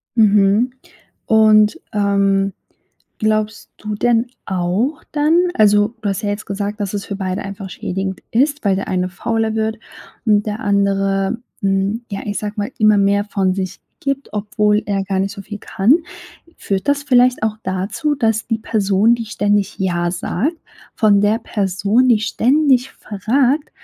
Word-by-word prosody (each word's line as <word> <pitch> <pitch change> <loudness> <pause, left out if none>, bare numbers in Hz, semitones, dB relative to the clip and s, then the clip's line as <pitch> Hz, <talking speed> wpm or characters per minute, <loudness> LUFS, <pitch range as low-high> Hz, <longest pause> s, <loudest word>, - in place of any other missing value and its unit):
Mhm, 210 +2 +4 0.6
und, 215 -1 +4
ähm, 200 -1 +1 0.7
glaubst 215 0 -1
du 210 0 -5
denn 235 +2 +2 0.2
auch 190 - -1
dann 325 +4 +2
also, 210 0 +3
du 205 - -1
hast 195 +1 -2
ja 205 - 0
jetzt 205 +1 -4
gesagt, 205 +2 -4
„dass 200 -1 -3
es 200 -1 -3
für 200 - -5
beide 185 -1 -3
einfach 195 0 -7
schädigend 190 +2 -4
ist“, 285 +5 +1
weil 200 -2 +2
der 195 - -4
eine 185 0 -1
fauler 225 +3 -2
wird 220 0 -1 0.5
und 210 -2 +3
der 210 0 -3
andere, 195 +1 +1 0.2
hm, 195 +4 0
ja, 195 - -4
ich 205 -1 -2
sage 210 -1 -4
mal, 205 +4 -2
immer 215 -1 +4
mehr 200 +1 +2
von 195 -3 0
sich 185 -1 -4 0.2
gibt, 275 0 -3
obwohl 210 0 +1
er 200 -1 -1
gar 195 0 -2
nicht 195 +1 -1
so 200 - -8
viel 210 +1 -8
kann. 210 +5 +2 0.6
Führt 195 +5 -3
das 285 0 +1
vielleicht 250 -4 +3
auch 215 -1 -1
dazu, 190 +11 -2
dass 225 -5 0
die 225 - 0
Person, 215 0 +2
die 230 -1 -5
ständig 205 -1 0
ja 175 -2 0
sagt, 210 - -2 0.4
von 205 -2 +4
der 205 +2 +2
Person, 205 +3 +1
die 235 -4 +4
ständig 260 +3 +2
fragt, 255 +8 0
210 Hz, 160 wpm, -18 LUFS, 195-225 Hz, 0.7 s, Mhm